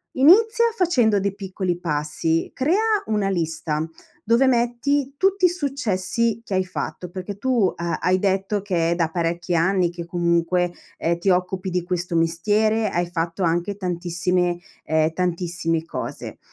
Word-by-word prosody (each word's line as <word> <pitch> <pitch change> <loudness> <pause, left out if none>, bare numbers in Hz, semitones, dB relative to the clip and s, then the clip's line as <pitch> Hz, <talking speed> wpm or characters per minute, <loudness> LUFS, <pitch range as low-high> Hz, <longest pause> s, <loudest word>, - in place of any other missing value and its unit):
Inizia 440 - +5
facendo 245 - +3
dei 195 0 -1
piccoli 190 -3 -3
passi, 160 0 -1
crea 410 +9 +2
una 210 -3 0
lista, 165 -3 -1 0.4
dove 235 +4 +4
metti 260 +3 +1
tutti 390 0 +1
i - - +6
successi 230 - -1
che 195 - -5
hai 185 0 +2
fatto. 180 0 -5
Perché 190 +2 -6
tu 240 -8 +2
ha 170 0 -2
hai 185 +1 +2
detto 195 +1 0
che 170 -4 0
è - - +2
da 170 -2 0
parecchi 170 +1 -2
anni 175 +1 +2
che 170 -1 -7
comunque, 175 0 +1 0.3
ehm, 170 +1 0
ti 190 +3 0
occupi 185 +1 -1
di 180 -1 0
questo 175 -1 -3
mestiere, 210 +7 +2
hai 175 0 -1
fatto 170 +1 -3
anche 175 +4 0
tantissime, 180 -1 -1 0.3
ehm, 160 0 +2
tantissime 175 -2 -1
cose. 165 - -6
185 Hz, 150 wpm, -22 LUFS, 170-220 Hz, 0.4 s, i